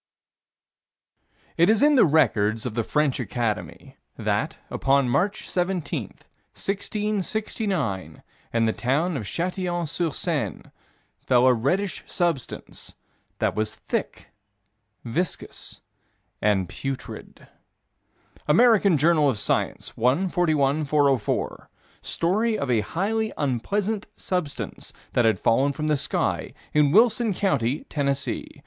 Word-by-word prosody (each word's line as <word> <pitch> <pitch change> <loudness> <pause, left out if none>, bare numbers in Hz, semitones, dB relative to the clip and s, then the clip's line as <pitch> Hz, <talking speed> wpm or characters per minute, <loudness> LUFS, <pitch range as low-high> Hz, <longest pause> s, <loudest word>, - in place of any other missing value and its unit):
4 165 - +4
It 175 - +5
is 220 +2 +4
in 300 0 +6
the 250 -10 +6
records 110 -8 +2
of 125 - -3
the 115 0 0
French 150 +2 +1
Academy 115 -5 -3 0.2
that, - - -1
upon 135 -1 +2
March 195 - 0
17, 180 -2 -1 0.5
1669, 200 - -2 0.3
in 115 -1 +2
the 110 - +1
town 150 +8 0
of 120 -7 -3
Châtillon 175 - -2
sur 165 +2 -1
Seine, - - -2 0.6
fell 125 -1 +3
a 130 - +6
reddish 175 - -1
substance 170 -8 -3 0.4
that - - 0
was 110 0 -2
"thick, - - -4 0.8
viscous, 165 +10 -4 0.6
and 100 -3 +2
putrid." 135 +8 -7 1.0
American 200 +1 +5
Journal 155 0 +4
of 125 - -1
Science, - - -1
1 135 +11 +2
41 155 -5 +2
404: 140 -6 0 0.3
Story 215 +6 0
of 140 -2 -2
a 115 -3 +3
highly 215 - -1
unpleasant 195 - -1
substance 180 -6 -4 0.2
that 120 - +3
had 110 -4 +3
fallen 135 +5 +3
from 155 +2 -4
the 150 - +3
sky, 140 - -1 0.2
in 150 -2 +4
Wilson 225 - +4
County, 140 - 0
Tennessee. 140 -2 -2
150 Hz, 115 wpm, -25 LUFS, 125-190 Hz, 1.0 s, in